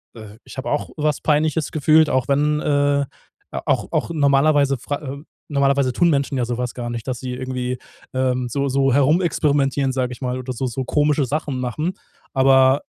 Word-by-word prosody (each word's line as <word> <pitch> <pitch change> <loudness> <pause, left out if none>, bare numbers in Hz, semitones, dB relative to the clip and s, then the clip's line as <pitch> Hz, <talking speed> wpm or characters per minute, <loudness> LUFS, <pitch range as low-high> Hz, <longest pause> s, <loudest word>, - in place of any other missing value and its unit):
äh 110 -1 -11
ich - - -12
habe 130 - -4
auch 145 - -2
was 150 -1 0
Peinliches 155 0 +1
gefühlt, 155 +1 +4
auch 130 0 0
wenn, 150 +2 +2
äh 145 -1 +2 0.6
auch - - 0
auch - - -1
normalerweise, 140 -1 +3
fra 140 +4 -4
äh, 140 -1 -6 0.3
normalerweise 140 -2 +2
tun 170 +7 +2
Menschen 140 -2 0
ja 125 - 0
so 120 0 -3
was 125 0 -3
gar 120 -1 -5
nicht, 120 -2 -5
dass 125 -2 -3
sie 130 -1 -5
irgendwie, 125 0 -3 0.4
ähm, 130 -1 0
so 140 +3 -1
so 135 0 +2
herumexperimentieren, 145 -2 +2
sage 130 -1 -2
ich 125 - -13
mal, 125 0 -2
oder 130 0 -5
so 130 +2 -3
so 125 +1 -4
komische 150 0 +2
Sachen 145 -1 -2
machen. 130 +8 -2 0.4
Aber 135 0 +5
135 Hz, 185 wpm, -21 LUFS, 130-145 Hz, 0.6 s, Aber